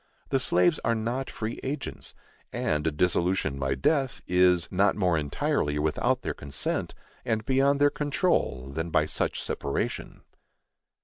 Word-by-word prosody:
The 135 - +2
slaves 90 -7 +3
are 115 0 +2
not 120 +4 -2
free 110 +1 -5
agents, 135 +1 -5 0.4
and 75 0 -1
a - - +2
dissolution 85 -2 +1
by 65 0 0
death, 135 - +1
is 90 -1 +3
not 95 +1 +3
more 90 -5 +2
entirely 75 -1 0
without 75 +1 0
their - - -2
consent, 70 -1 -3 0.3
and 110 -3 -1
beyond 135 +2 +3
their 145 0 +5
control, 145 - 0
than 80 +3 -3
by 80 -2 +3
such 75 - -2
separation. 70 - -3
90 Hz, 140 wpm, -27 LUFS, -, 0.4 s, their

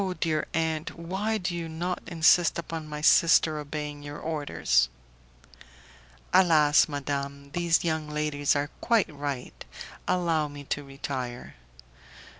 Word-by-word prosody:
dear 155 -2 0
aunt, 160 +1 -1
why 190 +6 -2
do 180 -3 -3
you 165 -1 -4
not 175 +3 -3
insist 170 0 +4
upon 165 -1 -5
my 150 0 -6
sister 155 0 +5
obeying 150 0 -5
your 145 0 -7
orders?" 145 - +1 1.4
"Alas! 155 -5 +5
madame, 140 -1 -4
these 170 0 +2
young 160 -2 -1
ladies 150 -1 0
are 145 +1 -1
quite 220 -9 +2
right. 140 -3 -5 0.4
Allow 170 -4 +1
me 145 0 -9
to 145 +1 -3
retire." 135 -3 -6
155 Hz, 120 wpm, -27 LUFS, 145-170 Hz, 1.4 s, sister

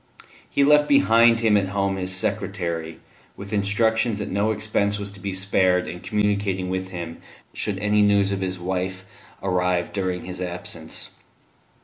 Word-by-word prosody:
He 140 - +2
left 150 +1 +5
behind 115 -5 +5
him 110 -2 +4
at 100 -2 +2
home 100 0 0
his 95 0 -2
secretary, 90 -4 -2 0.4
with 100 +1 -8
instructions 110 +2 +1
that 105 - -4
no 100 +3 +1
expense 105 -1 0
was 100 -1 -4
to 100 - -11
be 100 0 -4
spared 95 -1 +2
in 90 - -6
communicating 100 -2 -1
with 95 0 -3
him 85 -2 -6 0.3
should - - -3
any 105 0 +2
news 100 -1 +4
of 100 -1 -2
his 95 -1 -2
wife 95 +1 -3 0.4
arrive 90 -2 0
during 95 -2 -2
his 90 0 -6
absence. 90 -2 -5
100 Hz, 155 wpm, -23 LUFS, 90-105 Hz, 0.4 s, left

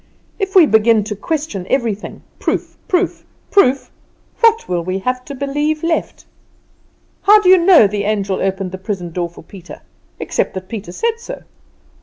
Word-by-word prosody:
If 390 0 -3
we 360 -4 +8
begin 220 -3 +3
to 210 0 -5
question 280 - -4
everything 225 -6 -2 0.2
proof, - - -2
proof, 365 0 0 0.3
proof, 275 -9 +3 0.5
what 455 -1 +3
will 175 -2 -1
we 185 +2 -2
have 250 +5 -2
to 280 - -7
believe 295 +3 -2
left? 330 -1 -2 1.0
How 420 +1 +6
do 385 -3 +2
you 375 - +8
know 340 - +6
the 200 0 -2
angel 200 -2 -1
opened 190 -1 -2
the 190 - -7
prison 185 -3 -5
door 175 0 -3
for 170 - -15
Peter, 185 +1 -12 0.4
except - - -2
that 185 0 -7
Peter 210 -5 -6
said 460 - -2
so? 470 - -8
225 Hz, 165 wpm, -17 LUFS, -, 1.0 s, we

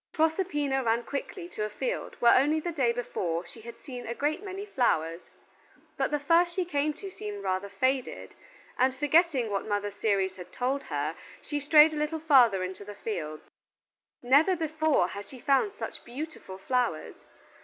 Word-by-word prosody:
Proserpina 310 -5 +1
ran 230 0 +1
quickly 340 +7 -5
to 215 - -4
a 210 - -2
field - - -4
where 235 -1 +6
only 295 +4 +3
the 345 +2 -3
day 265 -7 +2
before 180 -8 -3
she 225 - -13
had 235 +1 -10
seen 250 -3 -8
a 235 - -3
great 305 +7 -1
many 390 0 -6
flowers; 170 - 0 0.7
but - - 0
the 295 - +1
first 335 +4 +3
she 370 - 0
came 300 -3 0
to 385 +6 -9
seemed 205 - -7
rather 190 +1 -1
faded, 260 +3 -1 0.5
and 260 +1 +3
forgetting 295 - +2
what 200 +1 -2
Mother 205 -1 -1
Ceres 195 -2 0
had 180 - -10
told 265 +3 -2
her, 150 +1 -2 0.2
she 295 - -4
strayed 300 +2 +6
a - - -4
little 300 +2 -1
farther 250 -11 +5
into 185 +2 -6
the 205 0 -9
fields. 155 -8 -5 0.8
Never 285 +9 +5
before 315 - +1
had 200 0 -7
she 265 - -11
found 280 - +2
such - - -6
beautiful 245 -7 -7
flowers! 240 -6 -1
260 Hz, 175 wpm, -28 LUFS, 205-310 Hz, 0.8 s, where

